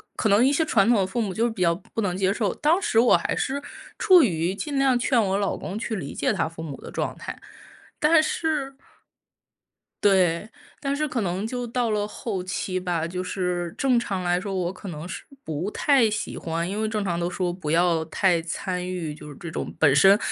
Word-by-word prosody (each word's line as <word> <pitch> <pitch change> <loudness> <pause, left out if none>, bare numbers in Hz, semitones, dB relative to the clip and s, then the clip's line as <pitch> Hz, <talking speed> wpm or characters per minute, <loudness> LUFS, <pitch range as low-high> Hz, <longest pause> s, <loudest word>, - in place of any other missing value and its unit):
可 220 - 0
能 205 +5 +5
一 275 - +3
些 320 - +2
传 220 -10 +3
统 235 -3 +4
的 190 - +1
父 240 +5 -3
母 205 -5 -1
就 225 - 0
是 - - +2
比 220 -4 -6
较 170 -1 +4
不 205 +5 -5
能 185 -4 -1
接 190 0 +1
受。 205 -2 0
当 320 +5 +2
时 390 - +2
我 240 - +6
还 - - -2
是 270 +2 -1 0.4
处 370 -4 +7
于 175 - +1
尽 280 +8 -4
量 270 -2 +4
劝 245 0 +2
我 195 -1 0
老 200 -1 -1
公 195 - -5
去 225 0 -3
理 160 -8 -5
解 - - 0
他 - - 0
父 165 0 -9
母 150 -4 -6
的 - - -10
状 - - -3
态。 - - -7 0.6
但 310 +1 +6
是 305 -4 -1 1.3
对， 190 -1 +3 0.3
但 280 -1 -1
是 305 +1 0
可 255 -5 -2
能 190 0 -1
就 245 +1 -3
到 235 -1 0
了 210 -1 0
后 210 -2 -4
期 185 0 -3
吧， 175 -3 -1
就 180 +2 -4
是 180 -2 -2
正 255 -3 +3
常 195 -5 -3
来 175 0 +1
说， 195 +1 -4
我 180 -1 -1
可 195 +2 -10
能 155 -3 -6
是 - - -7 0.2
不 160 +5 -3
太 270 -5 +3
喜 210 - -3
欢 165 +1 -3
因 205 +3 -2
为 220 - 0
正 215 -1 -2
常 170 -3 -1
都 175 0 -1
说 180 -1 -1
不 175 -4 -4
要 165 -1 +2
太 170 +1 +2
参 180 +2 -3
与， 170 -5 -4
就 150 - -11
是 145 - -10
这 170 - -7
种 - - -4
本 145 -4 +5
身 195 +8 +7
195 Hz, 245 characters per minute, -25 LUFS, 175-235 Hz, 1.3 s, 处